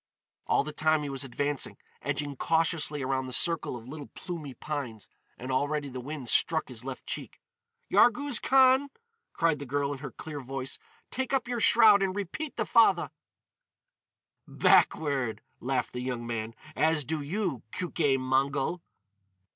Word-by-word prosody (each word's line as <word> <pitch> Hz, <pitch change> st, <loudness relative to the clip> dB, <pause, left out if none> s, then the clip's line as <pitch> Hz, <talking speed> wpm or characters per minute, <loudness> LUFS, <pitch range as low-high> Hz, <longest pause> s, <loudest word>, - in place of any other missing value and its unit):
All -, -, +3 dB
the 150 Hz, +1 st, -6 dB
time 155 Hz, 0 st, +2 dB
he 145 Hz, -, -4 dB
was 135 Hz, 0 st, -3 dB
advancing, 140 Hz, +2 st, -2 dB, 0.2 s
edging 145 Hz, 0 st, -2 dB
cautiously 160 Hz, -1 st, +1 dB
around 130 Hz, 0 st, -1 dB
the -, -, -7 dB
circle 165 Hz, +1 st, +1 dB
of 120 Hz, -1 st, -10 dB
little 145 Hz, +1 st, -8 dB
plumy 160 Hz, -7 st, -6 dB
pines; 130 Hz, -7 st, -5 dB, 0.3 s
and 130 Hz, +2 st, -6 dB
already 145 Hz, +2 st, 0 dB
the 130 Hz, -1 st, -6 dB
wind 140 Hz, -1 st, -6 dB
struck 160 Hz, +5 st, +2 dB
his 125 Hz, -2 st, -5 dB
left 130 Hz, 0 st, -7 dB
cheek. -, -, -6 dB, 0.5 s
"Yarghouz 250 Hz, +1 st, +4 dB
Khan!" 265 Hz, +1 st, +5 dB, 0.4 s
cried 165 Hz, -3 st, +1 dB
the 140 Hz, -, -6 dB
girl 140 Hz, +1 st, 0 dB
in 140 Hz, -, -5 dB
her 140 Hz, 0 st, -6 dB
clear 150 Hz, +3 st, -7 dB
voice. 135 Hz, 0 st, -5 dB, 0.3 s
"Take 265 Hz, +1 st, -2 dB
up 260 Hz, -3 st, +1 dB
your 245 Hz, -1 st, -2 dB
shroud 215 Hz, -2 st, +6 dB
and 190 Hz, -1 st, 0 dB
repeat 205 Hz, -, -4 dB
the -, -, 0 dB
fatha!" 230 Hz, -1 st, +4 dB, 1.4 s
"Backward!" 135 Hz, -7 st, +2 dB, 0.2 s
laughed 130 Hz, +1 st, -1 dB
the 125 Hz, -, -4 dB
young 125 Hz, -2 st, -3 dB
man, 115 Hz, -1 st, -4 dB, 0.2 s
"—as 160 Hz, -2 st, +2 dB
do 155 Hz, +2 st, -2 dB
you, 170 Hz, -, -2 dB
Keuke 155 Hz, -6 st, +1 dB
Mongol!" 135 Hz, +5 st, 0 dB
145 Hz, 155 wpm, -29 LUFS, 130-170 Hz, 1.4 s, shroud